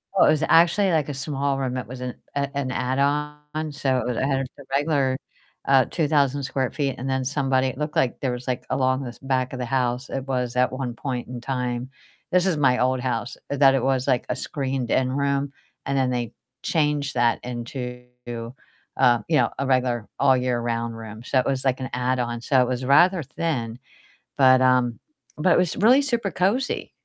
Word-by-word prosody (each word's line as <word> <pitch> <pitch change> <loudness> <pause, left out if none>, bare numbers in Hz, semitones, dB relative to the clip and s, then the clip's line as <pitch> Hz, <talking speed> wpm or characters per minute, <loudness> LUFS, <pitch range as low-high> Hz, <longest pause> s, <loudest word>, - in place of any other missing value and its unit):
Oh, - - +6
it - - +5
was 155 0 +1
actually, 175 +4 +4
like, 155 -3 +1
a - - -3
small 140 0 -2
room, 130 -1 -2
it 125 - -5
was 125 +1 -8
an, 125 -1 -4 0.2
uh 140 0 0
an 135 -2 -2
add-on, 150 +4 -1
so 135 -2 0
it - - -3
was 125 -2 -2
it - - 0
had 135 -1 +1
just - - -13
a - - -10
regular, 140 -2 +1 0.5
uh, 135 -2 +5
2,000 145 -3 +1
square 130 -1 -1
feet, 140 -3 -1
and 130 +2 -4
then 130 -1 0
somebody 135 -1 +1
It 130 - -5
looked 150 0 -3
like 125 - +1
there 130 -3 -1
was, 125 +1 -6
like, 125 -1 -2
along 130 0 +1
this 120 -2 -7
back 130 -1 -1
of 130 - -5
the 125 - -2
house, 125 0 -1
it 135 -1 -4
was 125 -2 -2
at 125 0 +2
one 130 -2 -4
point 125 -2 -4
in 120 -1 -7
time 125 -1 -3 0.4
this 180 +1 +3
is 170 -5 +1
my 130 -3 +3
old 130 0 +2
house, 120 -1 -3
that 135 -1 +5
it 130 - 0
was, 130 0 +1
like, 125 -3 +1
a - - 0
screened-in 130 -2 -1
room, 140 0 0 0.3
and 140 0 -1
then 130 -1 +2
they 120 -3 -2 0.3
changed 150 -5 0
that 120 -1 +2
into, 125 0 -6 0.9
uh, 120 -1 +4
you 160 -2 +3
know, - - +3
a 135 - 0
regular 125 -4 +1
all-year-round 120 -3 +1
room, 110 0 -9
so 130 - +1
it 125 - 0
was, 135 -1 -1
like, 130 0 +1
an 130 - -4
add-on, 125 -1 -1
so 130 +1 +3
it 125 - +2
was 125 0 -2
rather 175 +5 +5
thin, 130 -6 -3 0.6
but, 130 -1 +6
um 125 -2 +3 0.4
but, 180 - +4
it - - +4
was 180 -3 +1
really 250 +7 +5
super 235 -8 -1
cozy 215 +9 0
130 Hz, 205 wpm, -24 LUFS, 125-140 Hz, 0.9 s, Oh